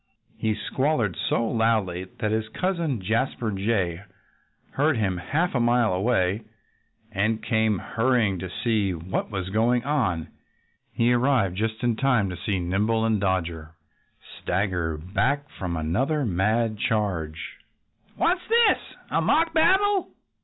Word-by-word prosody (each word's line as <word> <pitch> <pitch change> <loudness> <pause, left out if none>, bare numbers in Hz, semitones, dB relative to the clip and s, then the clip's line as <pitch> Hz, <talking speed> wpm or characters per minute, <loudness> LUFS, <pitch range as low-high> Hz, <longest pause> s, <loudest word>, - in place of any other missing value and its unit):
He 110 -1 0
squalled 115 - 0
so 115 - +1
loudly 110 -6 0
that 105 - 0
his 110 0 -1
cousin 170 - -1
Jasper 110 +2 -1
Jay 95 -4 -1 0.7
heard 145 -1 +1
him 95 -4 0
half 160 - -1
a 125 - +1
mile 120 -3 +3
away 95 0 +1 0.7
and 110 +2 0
came 110 -3 +1
hurrying 115 -1 +1
up 95 - -5
to 95 - -5
see 110 -5 +1
what 85 +3 -3
was 95 -3 -4
going 120 +3 +2
on. 115 - 0 0.6
He 120 +1 +2
arrived 120 -7 +2
just 110 +3 -2
in 120 -2 +1
time 125 -8 +2
to - - -5
see 95 +3 -2
Nimble 105 +6 0
and 110 -3 +1
Dodger 85 -4 -2 0.7
stagger 90 -4 -1
back 105 - -1
from 90 -3 -3
another 130 - 0
mad 110 +3 0
charge. 95 - -2 0.6
"What's 360 +1 +1
this? 465 0 +5 0.3
A - - +2
mock 330 +1 +2
battle?" 380 +4 +3
110 Hz, 135 wpm, -25 LUFS, 95-125 Hz, 0.7 s, this